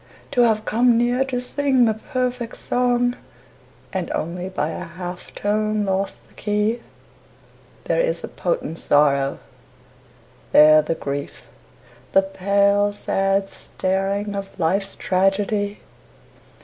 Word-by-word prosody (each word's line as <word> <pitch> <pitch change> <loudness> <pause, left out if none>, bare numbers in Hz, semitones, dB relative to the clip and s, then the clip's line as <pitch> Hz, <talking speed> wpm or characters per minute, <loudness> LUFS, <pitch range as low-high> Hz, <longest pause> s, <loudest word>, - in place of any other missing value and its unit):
To 250 -3 +3
have 220 -2 +3
come 235 +1 +3
near 245 +2 +2
to 255 -2 -2
sing 265 0 +2
the 220 - +2
perfect 250 +1 -3
song 245 0 +1 0.8
And 185 -3 -2
only 175 +3 -4
by 185 -5 -2
a 160 - -5
half 180 +1 -8
tone 215 0 0
lost 195 0 -2
the - - -24
key, 210 +3 -1 1.0
There - - 0
is - - 0
the - - -5
potent 485 - -3
sorrow, 140 -2 +2 1.2
there 155 +1 +8
the 160 +2 -2
grief, 140 -2 -6 0.6
The 195 - +5
pale, 200 +1 +2
sad 195 -1 0
staring 195 +2 -2
of 195 -1 -7
life's 195 +4 0
tragedy. 200 +2 0
200 Hz, 120 wpm, -22 LUFS, 185-235 Hz, 1.2 s, there